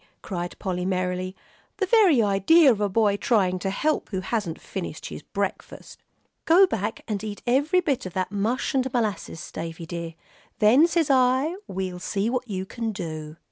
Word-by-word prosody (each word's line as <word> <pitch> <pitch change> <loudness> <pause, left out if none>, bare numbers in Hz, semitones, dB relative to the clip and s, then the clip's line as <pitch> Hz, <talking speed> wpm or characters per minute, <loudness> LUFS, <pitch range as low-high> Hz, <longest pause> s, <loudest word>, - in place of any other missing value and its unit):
cried 175 -3 -5
Polly, 180 -2 -3
merrily, 185 0 -2 0.4
"the 400 - +1
very 370 - +5
idea 235 - +5
of 210 -3 -1
a 205 - +1
boy 205 0 +2
trying 195 -4 +1
to 195 - -2
help 300 +11 -1
who 190 -3 -3
hasn't 190 -5 -3
finished - - -6
his - - -7
breakfast. - - -5 0.4
Go 355 +4 +7
back 220 - -3
and 210 -2 -3
eat 210 -2 -6
every 285 +9 +3
bit 280 - -1
of 180 - -9
that 185 0 -2
mush 210 +5 -1
and 260 -1 0
molasses, 210 -8 -3
Davie 165 0 -6
dear; 170 -1 -6 0.4
then, 250 +10 +6
says 330 -4 +1
I, 260 +4 +3
we'll 185 -1 -4
see 200 +4 -1
what 255 -1 -2
you 190 -3 -3
can 230 +2 -4
do." 155 -5 -6
205 Hz, 175 wpm, -25 LUFS, 185-255 Hz, 0.4 s, Go